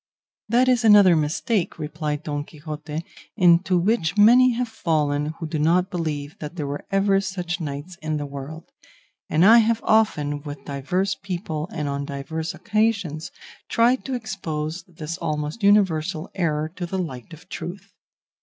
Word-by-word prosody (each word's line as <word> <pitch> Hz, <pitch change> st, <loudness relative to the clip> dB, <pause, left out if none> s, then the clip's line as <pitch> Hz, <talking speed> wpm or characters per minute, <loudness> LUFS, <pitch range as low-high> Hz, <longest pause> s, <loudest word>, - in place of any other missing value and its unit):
"That 245 Hz, +3 st, +4 dB
is 250 Hz, -2 st, +3 dB
another 205 Hz, -5 st, +7 dB
mistake," 165 Hz, +6 st, 0 dB
replied 150 Hz, -1 st, -4 dB
Don 145 Hz, -1 st, -3 dB
Quixote, 155 Hz, +1 st, -7 dB, 0.3 s
"into 180 Hz, 0 st, +4 dB
which 180 Hz, -1 st, +1 dB
many 245 Hz, +4 st, +7 dB
have 245 Hz, +1 st, -1 dB
fallen 155 Hz, -7 st, -1 dB
who 165 Hz, -, -5 dB
do 155 Hz, -1 st, -3 dB
not 180 Hz, +5 st, +2 dB
believe 155 Hz, -4 st, -4 dB
that 150 Hz, +2 st, -7 dB
there 155 Hz, -5 st, -3 dB, 0.3 s
ever 195 Hz, 0 st, +2 dB
were 195 Hz, -, +4 dB
such 180 Hz, -2 st, -3 dB
knights 150 Hz, +4 st, -6 dB
in 155 Hz, 0 st, -2 dB
the 145 Hz, -, -3 dB
world, 140 Hz, +3 st, -8 dB, 0.6 s
and 160 Hz, +4 st, +4 dB
I 230 Hz, +3 st, +9 dB
have 225 Hz, 0 st, +2 dB
often, 150 Hz, -10 st, +2 dB
with 145 Hz, -1 st, -8 dB
divers 180 Hz, +8 st, -1 dB
people 175 Hz, -4 st, -4 dB
and 150 Hz, -1 st, -3 dB
on 140 Hz, 0 st, -2 dB
divers 155 Hz, +4 st, -4 dB
occasions, 205 Hz, -8 st, -1 dB, 0.4 s
tried 240 Hz, +3 st, +3 dB
to 265 Hz, -, -2 dB
expose 175 Hz, -8 st, -4 dB
this 165 Hz, 0 st, -7 dB
almost 150 Hz, +6 st, -3 dB
universal 185 Hz, -6 st, +2 dB
error 155 Hz, -4 st, 0 dB
to 175 Hz, -1 st, -3 dB
the 190 Hz, -, -3 dB
light 145 Hz, -7 st, -5 dB
of 160 Hz, -1 st, -13 dB
truth. 175 Hz, +4 st, -7 dB
165 Hz, 155 wpm, -23 LUFS, 150-195 Hz, 0.6 s, I